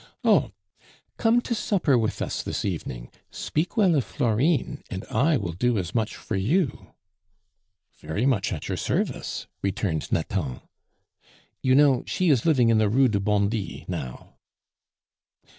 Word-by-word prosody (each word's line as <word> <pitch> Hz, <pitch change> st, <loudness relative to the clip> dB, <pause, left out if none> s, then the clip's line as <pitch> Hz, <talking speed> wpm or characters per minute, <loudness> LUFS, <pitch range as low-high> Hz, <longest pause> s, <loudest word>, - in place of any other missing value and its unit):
"Oh! -, -, +4 dB, 0.7 s
come 235 Hz, +1 st, +3 dB
to 240 Hz, -, -3 dB
supper 195 Hz, -, +1 dB
with 110 Hz, -3 st, 0 dB
us -, -, -3 dB
this -, -, -3 dB
evening; -, -, -4 dB, 0.2 s
speak 165 Hz, +8 st, -3 dB
well 195 Hz, -5 st, +5 dB
of 140 Hz, -5 st, +2 dB
Florine, 140 Hz, +5 st, 0 dB
and 95 Hz, -3 st, -5 dB
I 140 Hz, +7 st, +3 dB
will 100 Hz, -7 st, -3 dB
do 120 Hz, +7 st, 0 dB
as 90 Hz, -1 st, -3 dB
much 110 Hz, -3 st, -1 dB
for 110 Hz, -, -5 dB
you." 140 Hz, -, -1 dB, 1.0 s
"Very 100 Hz, +10 st, -2 dB
much 120 Hz, -8 st, +1 dB
at 80 Hz, -6 st, -4 dB
your -, -, -2 dB
service," -, -, -2 dB, 0.2 s
returned 95 Hz, -5 st, -2 dB
Nathan. 80 Hz, -6 st, -2 dB, 1.0 s
"You 130 Hz, -1 st, +3 dB
know; 140 Hz, -3 st, +5 dB
she 180 Hz, -3 st, +2 dB
is 130 Hz, +1 st, +2 dB
living 130 Hz, -7 st, +4 dB
in 110 Hz, -1 st, +4 dB
the 110 Hz, -1 st, +3 dB
Rue 130 Hz, +4 st, +4 dB
du 100 Hz, -2 st, 0 dB
Bondy 100 Hz, +1 st, -1 dB
now." 65 Hz, -1 st, -6 dB
115 Hz, 145 wpm, -25 LUFS, 100-145 Hz, 1.0 s, well